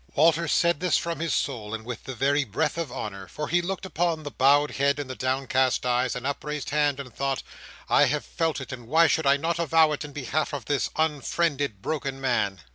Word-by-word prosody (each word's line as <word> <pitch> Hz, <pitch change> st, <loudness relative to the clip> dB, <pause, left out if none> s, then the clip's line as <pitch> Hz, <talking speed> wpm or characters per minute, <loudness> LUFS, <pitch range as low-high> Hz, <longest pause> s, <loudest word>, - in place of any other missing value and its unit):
Walter 165 Hz, +2 st, +4 dB
said 170 Hz, 0 st, +2 dB
this 180 Hz, 0 st, +2 dB
from 170 Hz, -1 st, -3 dB
his 165 Hz, 0 st, -1 dB
soul, 110 Hz, -5 st, -2 dB
and 110 Hz, 0 st, -8 dB
with 120 Hz, -2 st, -6 dB
the 130 Hz, -, -6 dB
very 140 Hz, +4 st, +2 dB
breath 140 Hz, +6 st, -1 dB
of 165 Hz, -6 st, -3 dB
honour. 100 Hz, -5 st, -6 dB
For 150 Hz, -, -5 dB
he 175 Hz, +1 st, +3 dB
looked 190 Hz, +2 st, -4 dB
upon 170 Hz, -3 st, -1 dB
the 145 Hz, -, -6 dB
bowed 145 Hz, +3 st, +4 dB
head, 140 Hz, 0 st, +1 dB
and 145 Hz, -2 st, -4 dB
the 130 Hz, -, -6 dB
downcast 130 Hz, 0 st, +1 dB
eyes, 125 Hz, 0 st, +1 dB
and 125 Hz, +1 st, -5 dB
upraised 150 Hz, +1 st, -3 dB
hand, 145 Hz, -2 st, +1 dB
and 130 Hz, -3 st, -8 dB
thought, 135 Hz, -1 st, -2 dB, 0.4 s
"I -, -, +5 dB
have -, -, -1 dB
felt 165 Hz, -3 st, -1 dB
it; 135 Hz, -, -7 dB
and 120 Hz, -3 st, -8 dB
why 160 Hz, +6 st, +5 dB
should 160 Hz, -2 st, +2 dB
I 140 Hz, +1 st, +5 dB
not 165 Hz, +3 st, -1 dB
avow 160 Hz, -1 st, +4 dB
it 150 Hz, -, -3 dB
in 150 Hz, -, -8 dB
behalf 145 Hz, +2 st, -2 dB
of 130 Hz, -5 st, -6 dB
this 145 Hz, 0 st, 0 dB
unfriended, 145 Hz, -, 0 dB
broken 140 Hz, -3 st, -3 dB
man!" 105 Hz, -8 st, 0 dB
145 Hz, 220 wpm, -26 LUFS, 130-160 Hz, 0.4 s, I